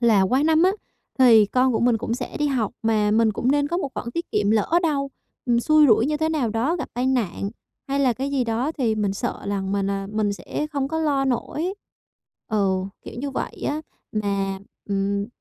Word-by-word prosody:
là 225 -5 +4
qua 255 +9 +2
năm 320 +1 +4
á 370 - +5 0.5
thì 225 -5 +7
con 255 +4 +2
của 225 - 0
mình 235 -1 +3
cũng 230 +1 -2
sẽ - - -5
đi 295 - +1
học, 245 -7 0
mà 215 -2 +2
mình 220 0 +3
cũng 240 +5 0
nên 290 0 +1
có 345 - -1
một 285 - -2
khoản 235 - -4
tiết 335 +1 -4
kiệm, 205 0 +2
lỡ 215 -2 +1
đâu 280 -4 0 0.4
mình 235 -1 +3
xui 310 +3 +5
rủi 225 +1 +4
như 300 - 0
thế 315 +1 0
nào 290 -8 0
đó, 240 +10 0
gặp 305 - -5
tai 250 +2 0
nạn 215 -6 -1 0.4
hay 275 +1 0
là 260 -3 +3
cái 270 +5 -3
gì 270 -3 +1
đó 235 +6 -1
thì 240 -8 0
mình 205 -2 0
sợ - - -3
rằng 195 -1 -2
mình, 200 0 0
à, 195 0 -3
mình 215 -1 0
sẽ 295 +8 -4
không 275 -2 -1
có 320 +2 -2
lo 285 -4 +1
nổi. 310 +8 -2 0.8
Ừ, 200 -3 +2 0.3
kiểu - - -8
như 280 +2 -3
vậy - - -5
á. 300 +2 -2 0.3
Mà, 200 -2 -1 0.3
ừm, 200 +1 0
240 Hz, 220 wpm, -23 LUFS, 210-280 Hz, 0.8 s, thì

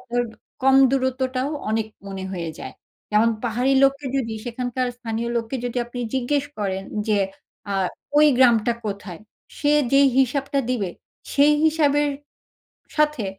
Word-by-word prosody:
আপনার 245 -1 -1 0.4
কম 270 0 +5
দূরত্বটাও 260 0 0 0.2
অনেক 220 0 0 0.2
মনে 190 -1 -6
হয়ে 170 -3 -4
যায়। - - -7 0.4
যেমন 220 +2 +4
পাহাড়ি 245 +4 +1
লোককে 275 +1 +2
যদি 230 -4 -1
সেখানকার 245 +1 -2
স্থানীয় 230 -1 -3
লোককে 235 +3 -2
যদি 245 0 -4
আপনি 245 +1 -6
জিজ্ঞেস 270 +2 0
করেন 195 -2 -2 0.3
যে, 210 -1 +3 0.5
আ - - 0 0.4
ওই 300 0 +7
গ্রামটা 240 -2 +4
কোথায় 200 -3 -6 0.4
সে 290 0 +2 0.2
যেই 275 0 +6
হিসাবটা 275 +2 +1
দিবে 205 -8 -1 0.4
সেই 290 +1 +5
হিসাবের 295 -2 +3 0.9
সাথে, 300 -7 +1
250 Hz, 135 wpm, -23 LUFS, 225-275 Hz, 0.9 s, ওই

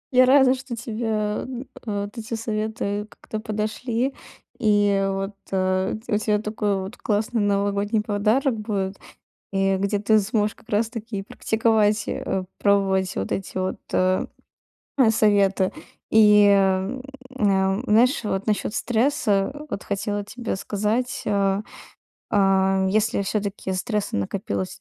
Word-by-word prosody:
Я 255 0 +7
рада, 265 -1 +6
что 260 -2 -6
тебе, 230 0 -5
м, 215 +4 -2 0.3
э, 205 -1 -1
вот 205 - -12
эти 225 +1 -4
советы 215 -2 -3
как-то 215 - -7
подошли. 225 +4 -2 0.5
И 205 -2 +3
вот, 195 +1 -3 0.2
э, 185 0 +1
тя - - -3
у 210 - +4
тя 210 -1 +1
такой 210 -1 -1
вот 200 +6 -8
классный 215 +1 0
новогодний 205 +1 +1
подарок 220 +5 +1
будет. 200 -3 -3 0.5
И 195 0 +2
где 200 +1 0
ты 215 +1 +4
сможешь 210 0 0
как - - -23
раз 215 +2 +1
таки 225 -3 -5
и - - -3
практиковать, 220 0 +1
э, 190 -1 -2
пробовать 195 -2 +2
вот 95 - -3
эти 195 - -3
вот, 185 0 -2 0.2
э, 185 0 +2 0.9
советы. 200 -3 +3 0.4
И, 210 -1 +7
э, - - +6
м, 190 +6 +1 0.4
э, 195 0 +2
знаешь, 240 +4 +3
вот 200 0 -2
насчёт 210 0 0
стресса 225 -4 +1 0.2
вот 200 - -4
хотела 205 0 -2
тебе 235 -1 -4
сказать. 215 +6 -1
Э, 200 -1 +1 0.7
а, 195 -1 +3
если 215 +1 +1
всё-таки 200 -1 -2
стресса 210 +2 -2
накопилось 185 - -3
210 Hz, 140 wpm, -23 LUFS, 195-220 Hz, 0.9 s, Я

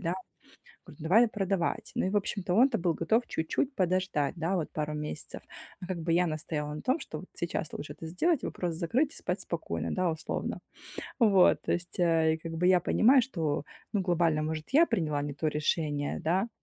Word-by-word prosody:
да". 170 0 -1 0.7
Говорю: 155 - -12
"Давай 215 +9 +5
продавать". 195 -5 -1
Ну - - +1
и - - +1
в 205 - -2
общем-то 195 -2 -1
он-то 245 +2 +5
был 170 -1 +1
готов 225 +2 +2
чуть-чуть 260 - -1
подождать, 185 -6 0
да, 170 +3 0
вот 165 -5 -2
пару 150 -1 -3
месяцев. 150 0 -6 0.4
А 180 - -6
как 185 -1 -3
бы 165 0 -2
я 175 +1 +3
настояла 150 -1 -3
на 150 - -6
том, 260 +5 +1
что - - -7
вот - - -11
сейчас - - -3
лучше - - -6
это - - -10
сделать, 285 - +1
вопрос 175 -2 -3
закрыть 225 - +1
и - - -14
спать - - -3
спокойно, - - -3
да, 185 -2 +1
условно. 160 0 -4 0.6
Вот. 205 -7 +5
То - - -1
есть, 175 +1 -3
э, 165 -2 +3
и - - -6
как 165 0 -7
бы 165 +2 0
я 185 -1 +5
понимаю, 250 +8 +5
что, 160 - -2 0.3
ну, 205 - +1
глобально, 170 -4 +2
может, 155 0 -3
я 330 +4 +7
приняла 150 - 0
не 145 -1 -4
то 150 +3 -2
решение, 150 -1 -1
да. 185 +8 +1
175 Hz, 200 wpm, -29 LUFS, 160-195 Hz, 0.7 s, я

